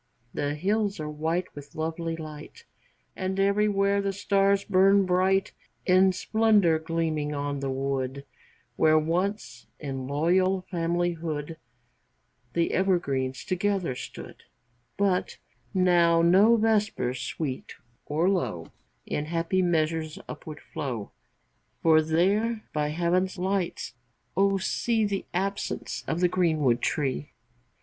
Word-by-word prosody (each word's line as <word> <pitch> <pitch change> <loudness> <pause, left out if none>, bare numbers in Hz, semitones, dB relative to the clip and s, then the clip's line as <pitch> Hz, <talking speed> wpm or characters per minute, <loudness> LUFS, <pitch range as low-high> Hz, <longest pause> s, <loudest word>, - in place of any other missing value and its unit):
III. 120 -1 -44 0.2
The 145 +1 -1
hills 200 +4 0
are 150 -1 -4
white 165 +4 -2
with 145 0 -11
lovely 165 +1 -3
light, 155 - -10 0.5
And 190 +1 -2
everywhere 200 0 +2
the 200 0 -1
stars 195 0 +2
burn 195 0 +4
bright 185 +2 +2 0.3
In 185 +1 +5
splendor 205 -4 +3
gleaming 160 -2 -2
on 145 0 -2
the 135 0 -3
wood, 135 0 -2 0.5
Where 155 0 +5
once, 180 +7 -2
in 135 -3 -5
loyal 180 +6 +1
familyhood, 165 -3 -2 1.0
The 170 -1 +1
evergreens 140 -9 0
together 185 -5 0
stood, 125 - -9 0.6
But 195 -2 0 0.3
now 175 -3 +4
no 195 +7 +6
vespers, 210 - +1
sweet 135 -2 -4 0.3
or 160 +4 +1
low, 125 - -1 0.3
In 150 - -2
happy 170 +3 0
measures 160 -2 0
upward 155 -1 -8
flow, 120 -7 -5 0.7
For 160 -1 +6
there 200 +8 +1
by 150 -1 0
Heaven's 175 +5 0
lights, 185 -5 -2 0.4
O 195 +1 +3
see 220 +3 0
The 200 -1 -2
absence 195 +3 -3
of 165 +2 -1
the 180 - +5
greenwood 155 -9 +1
tree! 135 - -2
170 Hz, 115 wpm, -27 LUFS, 150-195 Hz, 1.0 s, no